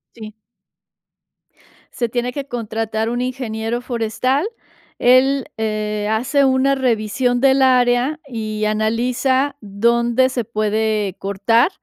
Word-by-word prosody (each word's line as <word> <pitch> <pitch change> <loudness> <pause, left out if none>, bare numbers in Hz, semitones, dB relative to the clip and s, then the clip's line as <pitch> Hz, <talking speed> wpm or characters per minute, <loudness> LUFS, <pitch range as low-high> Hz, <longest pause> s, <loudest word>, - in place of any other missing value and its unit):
Sí. 215 -2 -9 1.6
Se 240 - -2
tiene 245 +1 -2
que 280 0 -4
contratar 225 -2 -3
un 240 +1 -2
ingeniero 240 -2 -3
forestal, 250 - -1 0.5
él, 260 +2 +4
eh, 215 -1 -2
hace 270 +6 +2
una 265 +1 +2
revisión 245 0 0
del 270 0 +4
área 255 +3 +3
y 215 -4 -3
analiza 245 +6 0
dónde 235 +5 +1
se 255 -2 -2
puede 215 -2 -1
cortar, 200 - +2
235 Hz, 105 wpm, -19 LUFS, 220-260 Hz, 1.6 s, él